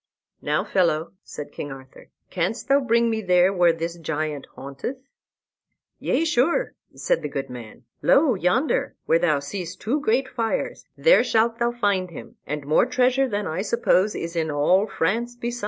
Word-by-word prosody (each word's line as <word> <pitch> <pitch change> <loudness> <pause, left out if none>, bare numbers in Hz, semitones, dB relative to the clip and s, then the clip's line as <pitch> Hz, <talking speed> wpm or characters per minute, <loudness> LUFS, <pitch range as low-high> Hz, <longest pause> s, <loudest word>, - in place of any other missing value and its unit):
"Now, - - 0
fellow," 165 -4 0
said 150 - -8
King 145 - -6
Arthur, 130 -1 -12 0.2
"canst 205 +7 -2
thou 275 +1 +5
bring 235 -3 +2
me 220 -1 -1
there 180 0 +3
where 175 -2 +4
this 165 +1 -5
giant 155 -2 -3
haunteth?" 140 - -6 1.0
"Yea, 330 - 0
sure," 330 - +1 0.2
said - - 0
the - - -4
good 135 -2 -5
man; 120 -1 -10 0.2
"lo, 280 -2 +4
yonder 250 - 0
where 165 - +3
thou 155 -4 +2
seest 170 +5 -6
two 255 +8 -1
great 255 +1 +1
fires, 230 -3 -3
there - - +5
shalt 230 +1 +1
thou 235 0 +1
find 200 -6 0
him, 170 - -11
and 150 0 -4
more 155 - +3
treasure 255 +1 +2
than 205 -2 -2
I 165 +3 -2
suppose 210 -2 +2
is 170 +1 -5
in 160 -1 0
all 165 +8 +2
France 225 +6 -1
beside." 240 0 -4
195 Hz, 170 wpm, -23 LUFS, 160-240 Hz, 1.0 s, thou